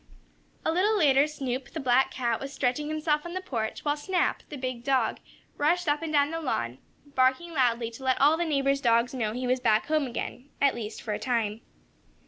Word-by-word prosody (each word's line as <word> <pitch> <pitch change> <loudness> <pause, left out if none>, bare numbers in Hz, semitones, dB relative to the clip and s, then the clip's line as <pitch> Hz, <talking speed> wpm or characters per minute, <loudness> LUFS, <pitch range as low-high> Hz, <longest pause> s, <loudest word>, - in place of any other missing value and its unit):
A - - +2
little 405 +6 +2
later 285 -4 +4
Snoop, 265 -4 -4
the 320 - -3
black 260 -1 +3
cat, 240 -3 -1
was 275 0 -6
stretching 270 +2 -1
himself 305 -1 0
on 345 +1 -7
the - - 0
porch, 230 -11 -4
while 290 0 +2
Snap, 360 +4 0
the 295 - -6
big 255 -2 -4
dog, 270 -1 +1 0.4
rushed 340 +4 +1
up 295 +1 +1
and 325 -1 -3
down 290 0 +3
the 330 0 -3
lawn, 120 - -2 0.3
barking 260 +7 +2
loudly 240 -4 +1
to 235 +3 -11
let 260 -1 +2
all 290 +3 +5
the 340 - 0
neighbors' 275 -3 +1
dogs 235 0 +3
know 225 -5 -1
he 250 +2 -3
was 255 +1 +1
back 220 -3 +2
home 305 -2 +1
again 245 +2 -6
at 280 -1 +4
least 220 -2 -6
for 215 - -2
a - - -3
time. 225 -3 -1
270 Hz, 210 wpm, -27 LUFS, 245-300 Hz, 0.4 s, all